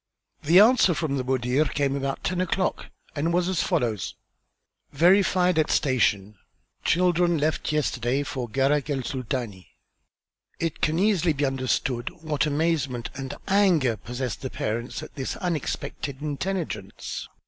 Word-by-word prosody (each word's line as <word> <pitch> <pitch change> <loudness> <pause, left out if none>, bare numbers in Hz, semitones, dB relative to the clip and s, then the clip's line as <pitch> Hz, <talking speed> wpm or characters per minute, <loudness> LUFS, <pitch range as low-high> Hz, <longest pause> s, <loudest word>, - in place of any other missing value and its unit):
The 170 +5 +6
answer 215 -5 +6
from 145 -3 -1
the 130 - -1
Mudir 130 +3 +1
came 140 -1 0
about 135 -1 -3
ten 180 0 0
o'clock 185 +1 -1 0.3
and 155 +3 0
was 175 +1 +1
as 185 -3 0
follows: 110 -6 -1 0.8
"Verified 180 +2 +4
at 155 - +2
station. 105 -7 +1 0.4
Children 175 -1 +3
left 155 +1 0
yesterday 135 -3 0
for 130 -4 -4
Gharak 140 +5 +1
el 135 -3 -1
Sultani." 120 -7 -4 0.9
It 165 -2 -3
can 155 +1 +1
easily 180 -4 +2
be 145 0 0
understood 130 -2 -1
what 155 0 0
amazement 145 -5 -1
and 135 0 -6
anger 180 - +3
possessed 120 +5 -5
the 130 - -4
parents 115 +2 -3
at - - -10
this 130 - -4
unexpected 155 -5 -3
intelligence. 150 - -4
145 Hz, 135 wpm, -25 LUFS, 130-170 Hz, 0.9 s, The